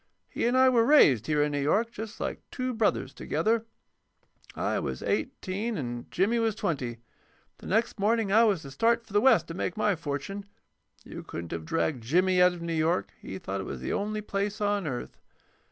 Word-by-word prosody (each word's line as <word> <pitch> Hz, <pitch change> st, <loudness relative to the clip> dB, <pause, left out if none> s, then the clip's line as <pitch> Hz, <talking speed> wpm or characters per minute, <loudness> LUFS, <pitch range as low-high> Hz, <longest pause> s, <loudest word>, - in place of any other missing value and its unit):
He -, -, -1 dB
and 250 Hz, +2 st, +2 dB
I 260 Hz, 0 st, +6 dB
were 240 Hz, -3 st, +4 dB
raised 150 Hz, -, +5 dB
here 150 Hz, -1 st, +2 dB
in 150 Hz, -, 0 dB
New 145 Hz, -1 st, -1 dB
York, 210 Hz, +11 st, +1 dB
just 220 Hz, -1 st, -7 dB
like -, -, -3 dB
two 255 Hz, -1 st, -3 dB
brothers, 210 Hz, -, 0 dB
together. 220 Hz, +12 st, 0 dB, 0.9 s
I -, -, -1 dB
was -, -, -4 dB
eighteen 205 Hz, +4 st, -2 dB
and 120 Hz, -3 st, -5 dB
Jimmy 215 Hz, +6 st, +1 dB
was 225 Hz, -2 st, +1 dB
twenty. 130 Hz, -, -2 dB, 0.6 s
The -, -, -10 dB
next 225 Hz, +2 st, 0 dB
morning 215 Hz, 0 st, +1 dB
I 225 Hz, +3 st, +6 dB
was 195 Hz, -7 st, +1 dB
to 135 Hz, -, -9 dB
start 230 Hz, -, +2 dB
for 210 Hz, -, -15 dB
the 205 Hz, -, +4 dB
West 225 Hz, -10 st, +5 dB
to -, -, -4 dB
make 180 Hz, +1 st, -3 dB
my 210 Hz, -2 st, +2 dB
fortune. 165 Hz, +6 st, -5 dB, 0.6 s
You -, -, -8 dB
couldn't 85 Hz, 0 st, -7 dB
have 80 Hz, -1 st, -4 dB
dragged 155 Hz, -, -1 dB
Jimmy 180 Hz, +9 st, +3 dB
out 180 Hz, 0 st, +6 dB
of 170 Hz, -1 st, -8 dB
New 170 Hz, 0 st, -2 dB
York; 165 Hz, +3 st, 0 dB
he 95 Hz, -, -6 dB
thought 95 Hz, +1 st, -4 dB
it -, -, -6 dB
was 65 Hz, -, -6 dB
the -, -, -2 dB
only 215 Hz, +1 st, -2 dB
place 205 Hz, 0 st, -3 dB
on 205 Hz, -4 st, 0 dB
earth. 125 Hz, -3 st, -5 dB
195 Hz, 200 wpm, -28 LUFS, 145-220 Hz, 0.9 s, I